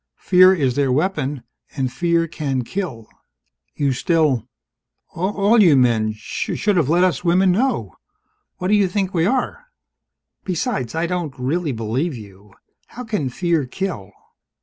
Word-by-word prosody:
Fear 185 Hz, 0 st, +5 dB
is 135 Hz, -7 st, 0 dB
their 140 Hz, -2 st, +1 dB
weapon 145 Hz, -3 st, -1 dB, 0.3 s
and 130 Hz, -2 st, -1 dB
fear 170 Hz, -1 st, +1 dB
can 140 Hz, -5 st, -3 dB
kill!" 130 Hz, -, -5 dB, 0.7 s
"You 140 Hz, -2 st, 0 dB
still 135 Hz, -4 st, +1 dB, 0.7 s
all 200 Hz, +5 st, +2 dB
you 165 Hz, -8 st, +6 dB
men 115 Hz, -4 st, +2 dB
should 180 Hz, -, -2 dB
have 160 Hz, -6 st, +1 dB
let 175 Hz, +3 st, +3 dB
us 180 Hz, -4 st, +1 dB
women 180 Hz, +2 st, +3 dB
know! 200 Hz, -, -1 dB, 0.6 s
What 185 Hz, -, -3 dB
do -, -, +3 dB
you 205 Hz, -2 st, +4 dB
think 190 Hz, 0 st, -2 dB
we 170 Hz, 0 st, +2 dB
are? 260 Hz, -, -2 dB, 0.8 s
Besides, 180 Hz, -, -2 dB
I 165 Hz, +1 st, 0 dB
don't 170 Hz, -5 st, -3 dB
really 145 Hz, +5 st, -1 dB
believe 125 Hz, +7 st, -2 dB
you. 100 Hz, -2 st, -13 dB, 0.4 s
How 250 Hz, -, -9 dB
can 210 Hz, -, -2 dB
fear 165 Hz, -1 st, -1 dB
kill?" 130 Hz, -, -5 dB
165 Hz, 145 wpm, -20 LUFS, 130-185 Hz, 0.8 s, you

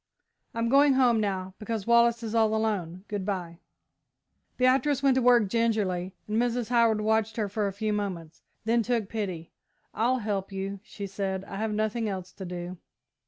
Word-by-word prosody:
I'm 230 Hz, 0 st, 0 dB
going 280 Hz, +3 st, +5 dB
home 250 Hz, -4 st, +4 dB
now, 190 Hz, -2 st, -2 dB
because 215 Hz, -1 st, -3 dB
Wallace 235 Hz, 0 st, +4 dB
is 220 Hz, -1 st, -4 dB
all 220 Hz, -1 st, +3 dB
alone. 195 Hz, -5 st, -2 dB
Good 205 Hz, -2 st, -3 dB
bye." 180 Hz, -4 st, -4 dB, 1.0 s
Beatrice 260 Hz, +2 st, +3 dB
went 275 Hz, -1 st, +5 dB
to 260 Hz, -, +2 dB
work 240 Hz, -3 st, +5 dB
gingerly, 195 Hz, -5 st, 0 dB
and 215 Hz, +2 st, +1 dB
Mrs. 240 Hz, -1 st, -1 dB
Howard 230 Hz, -3 st, +3 dB
watched 220 Hz, +1 st, +1 dB
her 215 Hz, -2 st, 0 dB
for 205 Hz, +1 st, -1 dB
a -, -, -2 dB
few 210 Hz, +2 st, -2 dB
moments, 180 Hz, -6 st, -4 dB, 0.2 s
then 230 Hz, +1 st, +3 dB
took 230 Hz, -3 st, -1 dB
pity. 185 Hz, -7 st, -4 dB, 0.4 s
"I'll 245 Hz, +4 st, +2 dB
help 205 Hz, -4 st, -3 dB
you," 195 Hz, +1 st, -4 dB
she 200 Hz, -1 st, -8 dB
said, 195 Hz, -1 st, -3 dB
"I 195 Hz, -, -7 dB
have 220 Hz, +1 st, -1 dB
nothing 215 Hz, +1 st, -1 dB
else 185 Hz, -2 st, -5 dB
to 190 Hz, -, -8 dB
do." 180 Hz, 0 st, -6 dB
215 Hz, 175 wpm, -27 LUFS, 195-230 Hz, 1.0 s, going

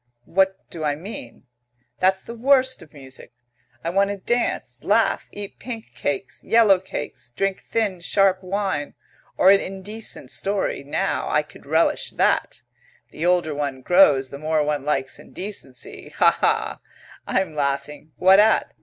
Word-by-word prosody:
What 190 Hz, +1 st, +1 dB
do 165 Hz, -2 st, -6 dB
I 145 Hz, -1 st, +1 dB
mean? 165 Hz, -, -9 dB, 0.6 s
That's 190 Hz, +1 st, +2 dB
the 235 Hz, -, -8 dB
worst 260 Hz, +2 st, +2 dB
of 150 Hz, -, -15 dB
music! 135 Hz, -3 st, -12 dB, 0.5 s
I 165 Hz, -, -1 dB
want 195 Hz, +2 st, +2 dB
to 200 Hz, -, -3 dB
dance, 240 Hz, +5 st, -2 dB
laugh, -, -, +2 dB
eat 205 Hz, -1 st, -8 dB
pink 230 Hz, -3 st, -7 dB
cakes, 195 Hz, 0 st, -4 dB
yellow 220 Hz, -5 st, +5 dB
cakes, 150 Hz, -8 st, -7 dB
drink 195 Hz, -1 st, -1 dB
thin, 210 Hz, -5 st, -1 dB
sharp 190 Hz, +1 st, +2 dB
wine. 190 Hz, -6 st, -2 dB, 0.4 s
Or 190 Hz, -, +7 dB
an 200 Hz, -, +6 dB
indecent 200 Hz, +4 st, -6 dB
story, 200 Hz, -7 st, -2 dB
now 140 Hz, -, -1 dB
I -, -, +2 dB
could -, -, -17 dB
relish -, -, +1 dB
that. -, -, +1 dB, 0.5 s
The 165 Hz, -, -3 dB
older 175 Hz, -4 st, +2 dB
one 140 Hz, -3 st, -3 dB
grows 145 Hz, -8 st, +5 dB
the 140 Hz, -, -7 dB
more 155 Hz, 0 st, +1 dB
one 150 Hz, -2 st, -1 dB
likes 135 Hz, -2 st, -2 dB
indecency. 180 Hz, -11 st, -9 dB
Hah, -, -, +5 dB
hah! -, -, +1 dB, 0.5 s
I'm 190 Hz, -4 st, 0 dB
laughing. 145 Hz, +1 st, -3 dB
What 190 Hz, +2 st, +6 dB
at? 220 Hz, +1 st, +3 dB
185 Hz, 150 wpm, -23 LUFS, 150-200 Hz, 0.6 s, Or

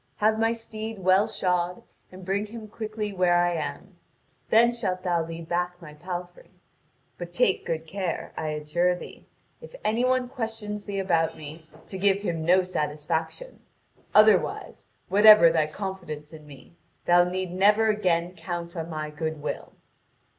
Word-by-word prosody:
Have 220 Hz, +1 st, +2 dB
my 225 Hz, 0 st, +3 dB
steed 225 Hz, -1 st, -6 dB
well 190 Hz, +2 st, +3 dB
shod, 180 Hz, -3 st, -1 dB, 0.3 s
and 185 Hz, 0 st, -11 dB
bring 200 Hz, +3 st, -1 dB
him 220 Hz, 0 st, -9 dB
quickly 215 Hz, -1 st, -5 dB
where 180 Hz, -2 st, +3 dB
I 175 Hz, 0 st, +2 dB
am; 155 Hz, -3 st, -5 dB, 0.5 s
then 235 Hz, +2 st, +5 dB
shalt 185 Hz, -6 st, -3 dB
thou 175 Hz, -3 st, +1 dB
lead 165 Hz, 0 st, -8 dB
back 175 Hz, +1 st, -2 dB
my 155 Hz, -4 st, -11 dB
palfrey. 180 Hz, -, -7 dB, 0.7 s
But 175 Hz, -1 st, -6 dB
take 195 Hz, -1 st, +1 dB
good 160 Hz, 0 st, -2 dB
care, 185 Hz, +1 st, -4 dB
I 155 Hz, -, -3 dB
adjure 155 Hz, +4 st, 0 dB
thee, -, -, -11 dB, 0.3 s
if 485 Hz, +1 st, -12 dB
any 225 Hz, +3 st, +1 dB
one 255 Hz, 0 st, +2 dB
questions 225 Hz, -5 st, -5 dB
thee 200 Hz, -1 st, -4 dB
about 170 Hz, -4 st, +1 dB
me, 155 Hz, +1 st, -10 dB, 0.2 s
to 190 Hz, -, -7 dB
give 200 Hz, 0 st, +2 dB
him 165 Hz, -5 st, -2 dB
no 180 Hz, +3 st, +4 dB
satisfaction. 160 Hz, -, -3 dB, 0.6 s
Otherwise, -, -, +3 dB, 0.2 s
whatever 205 Hz, -3 st, +8 dB
thy 155 Hz, -2 st, +2 dB
confidence 165 Hz, -4 st, -6 dB
in 155 Hz, -1 st, -12 dB
me, 140 Hz, +2 st, -14 dB, 0.3 s
thou 175 Hz, 0 st, +6 dB
need 185 Hz, 0 st, -3 dB
never 210 Hz, +4 st, +4 dB
again 180 Hz, -4 st, 0 dB
count 170 Hz, 0 st, -6 dB
on 165 Hz, -1 st, -5 dB
my 155 Hz, -1 st, -4 dB
goodwill." 155 Hz, -1 st, -5 dB
180 Hz, 155 wpm, -26 LUFS, 165-210 Hz, 0.7 s, whatever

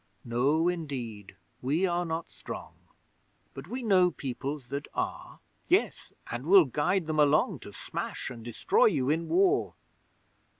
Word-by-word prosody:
No 135 Hz, +8 st, +2 dB
indeed! 130 Hz, -, -4 dB, 0.3 s
We 150 Hz, +9 st, +1 dB
are 175 Hz, -1 st, 0 dB
not 165 Hz, 0 st, -3 dB
strong, -, -, -8 dB, 0.8 s
But -, -, -9 dB
we 250 Hz, +1 st, -5 dB
know 185 Hz, -5 st, +5 dB
Peoples 135 Hz, -2 st, -5 dB
that 140 Hz, +1 st, -4 dB
are. -, -, -4 dB, 0.3 s
Yes, -, -, +1 dB, 0.2 s
and 120 Hz, +5 st, -5 dB
we'll 190 Hz, -2 st, +8 dB
guide 150 Hz, +7 st, 0 dB
them 155 Hz, -1 st, -1 dB
along, 150 Hz, +1 st, +3 dB
To -, -, -10 dB
smash -, -, -5 dB
and 115 Hz, -2 st, -9 dB
destroy 120 Hz, -1 st, +2 dB
you 145 Hz, -9 st, +2 dB
in 165 Hz, +2 st, -1 dB
War! 385 Hz, +3 st, +2 dB
155 Hz, 140 wpm, -29 LUFS, 130-180 Hz, 0.8 s, we'll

